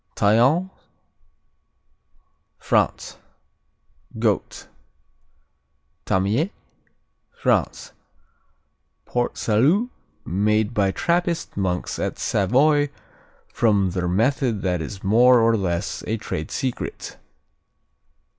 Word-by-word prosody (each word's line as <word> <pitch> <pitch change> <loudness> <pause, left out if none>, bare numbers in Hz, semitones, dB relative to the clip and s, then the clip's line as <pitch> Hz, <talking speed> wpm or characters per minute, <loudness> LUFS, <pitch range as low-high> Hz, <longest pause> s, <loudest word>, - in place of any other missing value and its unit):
Tallance 125 - +3 1.9
France - - -1 1.0
Goat. - - -1 1.4
Tamie 105 - +1 0.9
France - - 0 1.1
Port 120 0 -2
Salut 155 - +2 0.3
made 105 +4 +1
by 100 -3 +2
Trappist 170 - -1
monks 90 -2 -2
at - - -3
Savoy 145 +8 +2 0.6
from 100 -5 +2
their 90 0 -2
method 115 +3 0
that 90 -3 0
is 95 +5 -7
more 120 +5 +5
or 115 0 +3
less 90 -4 -2
a 110 - -1
trade 80 -7 -5
secret. 130 -3 -4
110 Hz, 80 wpm, -22 LUFS, 95-135 Hz, 1.9 s, more